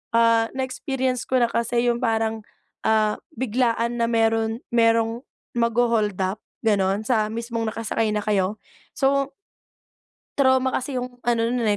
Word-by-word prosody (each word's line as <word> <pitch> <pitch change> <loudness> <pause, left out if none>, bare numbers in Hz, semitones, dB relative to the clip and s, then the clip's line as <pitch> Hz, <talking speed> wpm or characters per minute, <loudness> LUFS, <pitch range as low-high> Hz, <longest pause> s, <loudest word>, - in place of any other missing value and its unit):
ah, 230 0 +4
na 265 - -1
experience 260 -1 -2
ko 260 - 0
na - - +4
kasi 235 +1 0
yung 235 - -2
parang, 225 -1 0 0.5
ah, 215 -1 +2 0.2
biglaan 235 0 0
na 230 - +2
meron 225 0 +1
merong 230 +1 +2 0.3
magho-hold 230 -3 +2
up 190 +3 -2 0.2
ganun 200 -1 +2
sa 220 -3 +1
mismong 230 0 -3
nakasakay 225 -1 -1
na 210 - -1
kayo. 200 -1 +1 0.4
So 275 0 +1 1.0
trauma 260 -1 +3
kasi 260 0 -2
yung 250 0 -6
ano 230 -1 +1
no'n, 240 0 -1
230 Hz, 140 wpm, -23 LUFS, 220-245 Hz, 1.0 s, ah